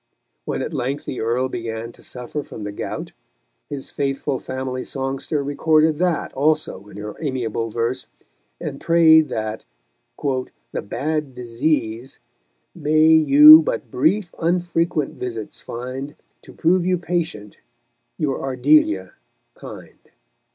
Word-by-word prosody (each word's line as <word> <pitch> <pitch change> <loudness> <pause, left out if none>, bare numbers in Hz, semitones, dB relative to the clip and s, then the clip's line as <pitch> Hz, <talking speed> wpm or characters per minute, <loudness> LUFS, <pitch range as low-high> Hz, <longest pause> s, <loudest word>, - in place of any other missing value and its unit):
When - - -2
at 160 - -5
length 135 +1 -2
the 130 - -4
Earl 120 +3 0
began 115 -2 -5
to - - -19
suffer 125 +4 -6
from 110 - -9
the 105 - -4
gout, 100 - -5 0.6
his 140 -2 -6
faithful 135 -1 -2
family 130 -1 -4
songster 135 +2 -3
recorded 155 +2 +2
that 175 -3 0
also 145 -8 0
in - - -12
her 105 0 -6
amiable 120 -6 -2
verse, 120 +3 -2 0.5
and - - -6
prayed 160 -2 +5
that 110 -2 -4 0.5
"the 130 -3 -4
bad 150 +4 -3
disease" 120 0 -2 0.6
May 155 -1 +2
you 155 0 +9
but 135 -6 -3
brief 170 +7 +1
unfrequent 170 -3 0
visits 115 -4 -5
find 130 +4 -6 0.3
To - - -14
prove 175 +2 +2
you 180 0 +1
patient, 165 - -3 0.6
your 145 -5 -1
Ardelia 130 -8 +2 0.4
kind. - - -11
135 Hz, 125 wpm, -21 LUFS, 120-155 Hz, 0.6 s, you